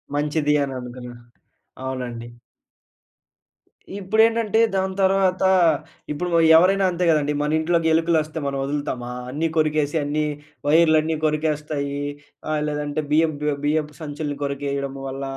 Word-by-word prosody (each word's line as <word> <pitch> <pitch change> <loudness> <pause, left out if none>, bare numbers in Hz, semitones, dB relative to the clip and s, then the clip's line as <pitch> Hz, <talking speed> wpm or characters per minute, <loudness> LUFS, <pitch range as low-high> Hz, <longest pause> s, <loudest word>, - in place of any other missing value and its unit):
మంచిది 150 0 +1
అని 135 -1 -4
అనుకున్నా. 125 0 -8 0.7
అవునండి. 125 -3 -5 1.7
ఇప్పుడేంటంటే, 220 +2 +2 0.2
దాని 190 0 -1
తర్వాత 190 -1 +2 0.7
ఇప్పుడు 175 +5 -3 0.3
ఎవరైనా 195 +3 +4
అంతే 180 +1 -1
కదండీ. 150 -2 +2
మన 150 +1 0
ఇంట్లోకి 165 0 +1
ఎలుకలు 165 0 +2
వస్తే 155 +1 -6
మనం 140 0 -2
వదులుతామా? 135 -3 -3 0.2
అన్నీ 150 +5 -1
కొరికేసి, 155 -1 +1
అన్ని 150 +1 -1 0.4
వైర్లన్నీ 160 0 +4
కొరికేస్తాయి. 150 -2 -1 0.5
ఆహ్, 150 - 0
లేదంటే 150 +1 -2
బియ్యపు 155 0 +3
బియ్యపు 150 -1 -1
బియ్యపు 150 -1 0
సంచులని 145 -1 -4
కొరికేయడం 140 -1 -3
వల్ల 135 +1 -5
150 Hz, 115 wpm, -22 LUFS, 140-165 Hz, 1.7 s, ఎవరైనా